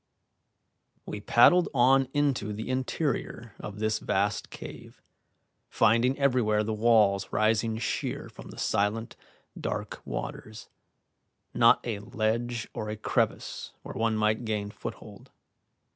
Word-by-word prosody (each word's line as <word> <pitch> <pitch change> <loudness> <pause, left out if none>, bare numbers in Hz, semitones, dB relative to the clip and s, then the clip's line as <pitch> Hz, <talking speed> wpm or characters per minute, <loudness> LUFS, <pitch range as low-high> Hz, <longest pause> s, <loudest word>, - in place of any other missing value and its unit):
We 105 - -6
paddled 170 - +5
on 135 +2 +5
into 135 -8 0
the 110 +4 -6
interior 130 -3 -2
of 105 -1 -7
this 110 +1 0
vast 100 +2 -1
cave, - - -10 0.7
finding 120 +5 +3
everywhere 125 -6 +2
the 110 +1 -2
walls 105 -3 +3
rising 110 +1 +1
sheer 110 - -3
from - - -12
the - - -11
silent, 105 +3 0 0.4
dark - - -4
waters, 110 0 -6 0.8
not - - +5
a 110 -4 -2
ledge 110 +3 -2
or 105 - -4
a 105 - -4
crevice 110 - -1
where - - -7
one 115 -1 0
might 110 +2 +1
gain 105 -2 -2
foothold. 105 - -9
110 Hz, 120 wpm, -28 LUFS, 105-120 Hz, 0.8 s, paddled